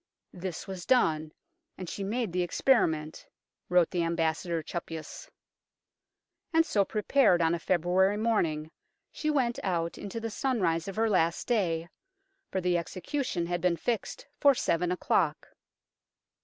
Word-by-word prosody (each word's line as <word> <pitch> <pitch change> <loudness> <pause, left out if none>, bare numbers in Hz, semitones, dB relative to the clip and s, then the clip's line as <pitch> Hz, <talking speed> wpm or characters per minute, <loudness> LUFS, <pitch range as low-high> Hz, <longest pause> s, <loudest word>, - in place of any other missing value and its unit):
This 180 -2 -5
was 190 -3 -7
done, 160 -11 +2 0.5
and 185 - -6
she 200 - -5
made 215 -1 -2
the 180 - +1
experiment," 165 - +1 0.4
wrote 180 -2 +4
the 175 - 0
Ambassador 165 0 -1
Chappuys. 165 -1 -7 1.2
And 325 0 +4
so 205 -10 +2
prepared, 215 -1 +3
on 165 0 +2
a 170 - -1
February 185 +4 +2
morning, 165 -9 0 0.4
she 305 - -2
went 255 -5 +1
out 170 -3 -2
into 205 +3 -5
the 225 0 -4
sunrise 195 -11 0
of 195 - -5
her 225 +1 +2
last 170 -5 +1
day, 170 -8 0 0.6
for 190 - -1
the 180 -1 +1
execution 180 - -3
had 175 0 -2
been 180 -2 +2
fixed 235 +2 -3
for 280 -1 +6
seven 175 -5 0
o'clock. 170 -3 0
180 Hz, 140 wpm, -29 LUFS, 165-220 Hz, 1.2 s, for